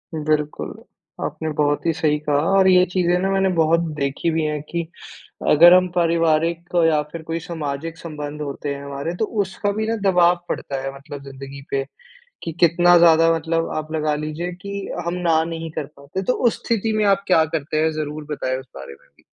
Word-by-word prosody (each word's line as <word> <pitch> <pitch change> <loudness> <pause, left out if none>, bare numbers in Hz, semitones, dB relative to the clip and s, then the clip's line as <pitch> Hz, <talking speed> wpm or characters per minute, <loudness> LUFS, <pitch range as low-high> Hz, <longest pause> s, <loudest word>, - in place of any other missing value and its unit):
बिल्कुल। 150 -1 -1 0.5
आपने 160 - -4
बहुत 145 +1 0
ही 165 - +3
सही 150 -1 +1
कहा 150 -1 -1 0.2
और 190 -1 +5
ये 180 -1 +6
चीज़ें 180 -1 +2
ना 195 - 0
मैंने 195 0 +2
बहुत 165 +1 +3 0.2
देखी 140 +3 -1
भी 160 0 0
है 150 0 -1
कि 170 0 -1 0.7
अगर 170 +4 +8
हम 185 0 +5
पारिवारिक 165 0 +1 0.2
या 155 -2 +3
फिर 165 - -6
कोई 165 +1 -3
सामाजिक 160 -1 -5
संबंध 150 -2 -7
होते 145 0 -4
हैं 140 - -8
हमारे 140 +5 -4
तो 220 - +2 0.2
उसका 195 +2 -3
भी 220 +2 -2
ना 225 - 0
दबाव 175 -1 +4
पड़ता 135 -1 -3
है 135 0 -4
मतलब 140 0 -10
ज़िन्दगी 135 0 -9
पे। 135 0 0 0.6
कि 165 - -3
कितना 175 +1 +5
ज़्यादा 165 -1 +6
मतलब 165 +1 -1
आप 155 0 -4
लगा 155 -1 0
लीजिए 155 +4 -4
कि 200 - -7 0.3
हम 170 - -1
ना 160 -1 +4
नहीं 165 -1 -5
कर 150 - -4
पाते 140 +7 -5
तो। 250 - +1 0.2
उस - - -5
स्थिति 225 -1 0
में 215 - +2
आप 200 0 +3
क्या 160 -4 +5
करते 155 -1 -3
हैं? 160 - +2
ज़रूर 155 0 -4
बताएँ 130 -3 -2
उस 130 - -13
बारे 70 0 -9
में - - -27
भी। - - -25
160 Hz, 200 wpm, -21 LUFS, 150-175 Hz, 0.7 s, अगर